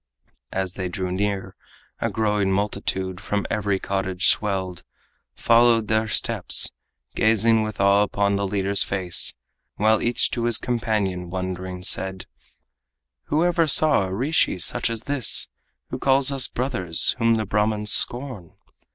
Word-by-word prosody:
As 95 -1 -3
they 95 -1 -5
drew 90 +1 -4
near, 100 +1 -3 0.4
a - - -1
growing 105 -3 -1
multitude, 95 -2 -3
From 100 0 -3
every 100 -2 -1
cottage 95 -1 0
swelled, 95 -4 0 0.5
followed 115 -2 +3
their 110 0 0
steps, - - +1 0.4
Gazing 110 0 +2
with 110 -1 -5
awe 100 +1 +3
upon 100 -1 0
the 100 0 -2
leader's 100 0 -1
face, 95 -3 +1 0.4
While 110 +1 +2
each 120 +1 +1
to 120 -1 -3
his 120 -1 +4
companion 105 -8 -2
wondering 90 0 -6
said: 95 0 -1 1.0
"Who 155 +3 0
ever 170 -2 +1
saw 150 -7 +4
a 95 - -6
rishi 130 +2 0
such 90 - 0
as 115 -1 -5
this, 140 -6 0 0.4
Who - - -5
calls 135 0 +2
us 135 -2 0
brothers, 105 -10 0
whom 115 -1 +2
the 110 -1 -2
Brahmans 105 +1 0
scorn?" 120 -9 +4
105 Hz, 140 wpm, -22 LUFS, 95-115 Hz, 1.0 s, his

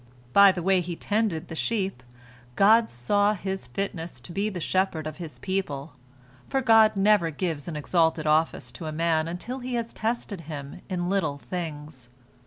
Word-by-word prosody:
By 200 -1 +8
the 180 -2 -4
way 190 0 +3
he 175 0 -4
tended 205 -5 -1
the - - -8
sheep, 195 - -1 0.5
God 225 +3 +5
saw 205 - +1
his 190 -5 -4
fitness 165 0 -4
to 125 - -9
be 200 +4 0
the 190 -4 -5
shepherd 180 -2 0
of 155 -1 -5
His 165 -3 -8
people, 165 -7 -3 0.6
for 270 - +1
God 225 -4 +5
never 195 -3 +4
gives 160 -2 -3
an 170 - -4
exalted 160 +1 +1
office 155 +1 +1
to 165 - -7
a - - -3
man 160 0 +1
until 185 +10 -5
He 250 0 -4
has 235 -1 -3
tested 220 -4 -3
him 145 +2 -7
in 175 -2 -2
little 180 -7 0
things. 150 -6 -6
175 Hz, 175 wpm, -26 LUFS, 155-200 Hz, 0.6 s, By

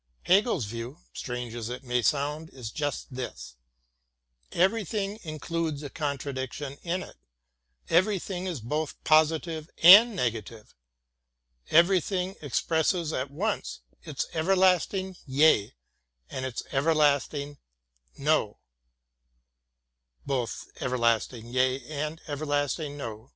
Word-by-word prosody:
Hegel's 195 - +3
view, 115 +6 -6 0.2
strange 125 -2 -5
as 115 -1 -5
it 125 +2 -6
may 125 -1 0
sound, 150 +5 0
is 120 -4 -8
just 145 -2 -3
this: 125 - -7 1.0
everything 200 +2 0
includes 155 -1 -3
a 145 - -6
con 145 -3 -2
tradiction 135 +1 -5
in 180 +2 -2
it, - - -13 0.7
everything 185 0 +1
is 170 -9 -4
both 150 +6 -2
positive 160 +1 +2
and 210 +6 +10
negative, 115 - -3 1.0
everything 185 +2 +3
expresses 160 +3 0
at 130 +2 -2
once 200 +10 -3 0.2
its 150 -4 -4
Everlasting 185 +2 +2
Yea 130 - +4 0.6
and 130 0 -3
its 125 - -5
Everlasting 145 -1 +1 0.6
No. 140 -7 +1
155 Hz, 85 wpm, -27 LUFS, 130-180 Hz, 1.0 s, and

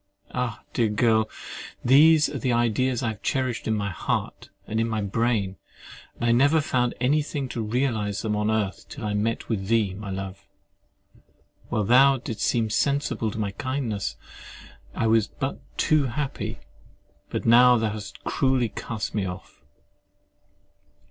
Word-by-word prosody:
Ah! 120 -3 -3
dear 115 -2 +2
girl, 110 0 +2 0.6
these 150 +4 +6
are 145 -1 -5
the 125 +2 0
ideas 120 +1 +1
I 115 - +1
have 110 -2 -7
cherished 130 -3 -1
in 110 - +1
my 100 -1 -2
heart, 85 - -3 0.2
and 110 +2 -2
in 115 0 +1
my 110 -1 -1
brain; 100 -2 0 0.6
and - - -3
I 115 - +4
never 140 +7 +4
found 125 -4 0
any 140 +5 +3
thing 145 -2 -4
to 115 - -3
realise 110 -3 -1
them 105 -2 0
on 105 0 0
earth 110 -3 -2
till 110 - -7
I 105 - -1
met 110 +3 -1
with 95 -4 -2
thee, 110 -4 +2
my 100 +1 -7
love! 95 0 -6 1.2
While 105 - 0
thou 135 +5 +6
didst 120 -3 -5
seem 115 -2 +1
sensible 140 -3 0
of 110 - -4
my 105 -2 -1
kindness, 130 -4 -3 0.8
I - - 0
was 110 -2 +3
but 135 +1 -4 0.2
too 155 -2 +3
happy: 135 +2 -3 0.7
but - - -3
now 125 +2 +7
thou 110 -1 0
hast 105 -2 -8
cruelly 130 -4 +1
cast 110 -1 -5
me 100 -3 -1
off. 90 +1 -9
115 Hz, 160 wpm, -25 LUFS, 105-130 Hz, 1.2 s, now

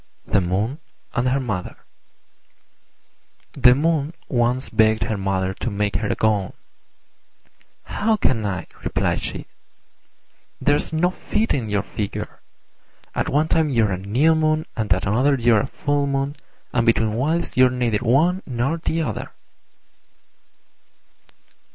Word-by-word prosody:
THE 100 - +2
MOON 100 - -1 0.3
AND 125 +1 +1
HER 135 +2 +1
MOTHER 110 -9 -4 1.8
The 125 0 +6
Moon 155 +1 0
once 125 +1 +1
begged 110 -1 +3
her 110 - -2
Mother 95 -1 -1
to 120 - -4
make 100 -1 -1
her 110 +1 -2
a - - 0
gown. 105 -4 0 1.3
"How 220 +1 0
can 120 - +1
I?" 100 -3 -3 0.2
replied - - 0
she; - - -5 1.1
"there's 145 +2 +1
no 170 +3 +1
fitting 145 - -1
your 100 -1 0
figure. 100 0 -5 0.7
At - - -1
one 150 +3 +2
time 160 -1 +2
you're 115 -6 +2
a 95 - -1
New 125 +12 +2
Moon, 155 0 +1
and 110 -4 -3
at 95 +2 +2
another 125 +8 +3
you're 115 -4 +3
a - - -4
Full 145 0 -1
Moon; 140 +1 -1 0.4
and 115 - +2
between 115 -2 +2
whiles 155 +9 -1
you're 130 0 +6
neither 120 -4 0
one 155 +10 +2
nor 130 +6 -1
the 160 0 -1
other." 110 -8 -4
125 Hz, 135 wpm, -22 LUFS, 105-145 Hz, 1.8 s, The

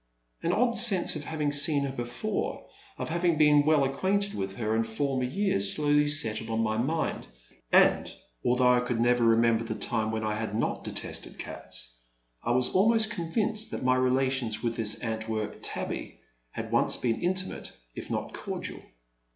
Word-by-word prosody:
An 170 - 0
odd 235 +4 +1
sense 205 -9 +4
of 150 -1 -5
having 150 -2 -2
seen 145 0 +5
her 140 - -3
before 125 - -4 0.2
— - - -25
of - - -5
having 170 0 +1
been 150 -1 +5
well 155 -3 +4
acquainted 190 +9 0
with 95 -1 -4
her 110 -1 -1
in 115 - +1
former 130 +3 -2
years 125 - +4
slowly 150 0 +2
settled 115 -7 +2
in 110 0 -1
my 110 -1 0
mind, 155 +8 -2 0.4
and, - - +4 0.3
although 125 0 +3
I 125 - +4
cotild 125 -1 -2
never 120 +1 +2
remember 115 0 +3
the 115 -1 -5
time 110 -1 -1
when 110 0 -3
I 110 0 -1
had 105 -1 -4
not 115 - -2
detested - - -5
cats, - - -6 0.5
I - - -4
was 125 +1 +2
almost 220 +2 +3
convinced 210 +5 -1
that - - -5
my 130 0 +3
relations 130 -3 0
with 115 -1 -1
this 110 -2 +2
Antwerp 110 -2 -3
tabby - - -5 0.3
had - - -7
once - - +2
been 115 -2 -1
intimate 185 +1 -2 0.2
if - - -8
not - - -4
cordial. - - -5
130 Hz, 175 wpm, -27 LUFS, 115-160 Hz, 0.5 s, seen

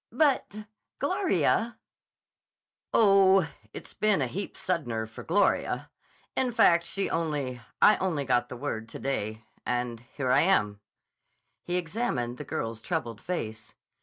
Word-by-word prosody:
"But, 245 -6 +1 0.3
Gloria—" 270 - +1 1.1
"Oh, 195 -4 +5 0.2
it's - - -9
been 210 -4 +2
a 135 - +1
heap 195 +11 -5
suddener 120 -11 -2
for 110 - -10
Gloria. 195 +3 +1 0.4
In 255 -2 +1
fact 170 -7 +5
she 195 +2 -1
only—I 145 - +1
only 165 -7 -1
got 125 -1 +1
the 125 - -7
word 115 -4 -4
to - - -7
day. 110 -5 -3 0.2
And 120 -1 -2
here 125 +2 -3
I 135 +3 +5
am." 105 - +2 0.8
He 175 - -3
examined 160 - -2
the - - -4
girl's 115 0 -3
troubled 120 - -3
face. 115 -11 -5
155 Hz, 130 wpm, -28 LUFS, 120-195 Hz, 1.1 s, Oh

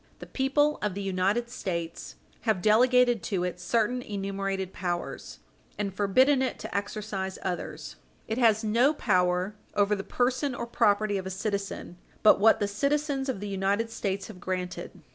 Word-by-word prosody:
The - - -9
people 290 +3 +1
of 210 -3 -1
the 200 - -3
United 195 +5 0
States 170 -7 -4 0.3
have 220 -5 +1
delegated 245 +2 +4
to 190 -4 -1
it 180 0 -3
certain 235 +5 0
enumerated 195 -3 -3
powers 175 -1 -4 0.4
and 200 -2 -2
forbidden 255 +8 +3
it 260 - -1
to - - -7
exercise 200 -2 -3
others. 180 -2 -5 0.3
It 220 +3 -2
has 225 -2 +4
no 240 +8 +3
power 180 -3 +1 0.2
over 205 0 +3
the 195 - -5
person 255 +4 0
or 235 - -4
property 205 -3 +2
of 190 - -6
a - - -3
citizen 200 -2 -4 0.3
but 215 - +7
what 220 +2 +5
the 205 - +1
citizens 280 +5 0
of 235 -7 -3
the 205 - -4
United 200 +3 0
States 200 -3 -2
have 210 -5 -10
granted. 180 -1 -4
205 Hz, 160 wpm, -28 LUFS, 190-240 Hz, 0.4 s, but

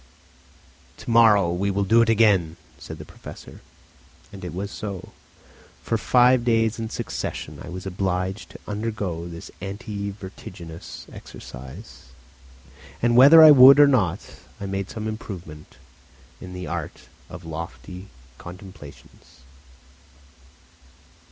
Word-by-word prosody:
"To - - -6
morrow 105 -6 +5
we 100 +3 -1
will 100 0 0
do 115 +4 +4
it 115 - +2
again," 100 -8 +3 0.2
said - - -9
the - - -10
Professor. - - -12 0.7
And 95 - -10
it 90 - -5
was 100 +4 -5
so; 100 -3 -7 0.7
for 95 - -1
five 125 +2 +4
days 115 -1 +1
in 110 -1 -4
succession, - - -5
I - - -9
was 90 +1 -8
obliged 95 +1 -3
to - - -13
undergo 105 -6 -4
this 85 -1 -10
anti 100 +1 -5
vertiginous 95 -4 -10
exercise; 65 +1 -11 0.9
and 120 0 +2
whether 145 +6 +9
I 155 - +10
would 135 0 +9
or 145 - +8
not, 100 -10 0 0.2
I 100 - -6
made 95 0 -4
some 110 -1 -6
improvement 90 -8 -8 0.6
in 90 0 -10
the 90 0 -6
art 85 -4 -6 0.3
of - - -10
"lofty 85 +3 -8 0.3
contemplations." 90 -8 -13
100 Hz, 125 wpm, -23 LUFS, 90-115 Hz, 0.9 s, I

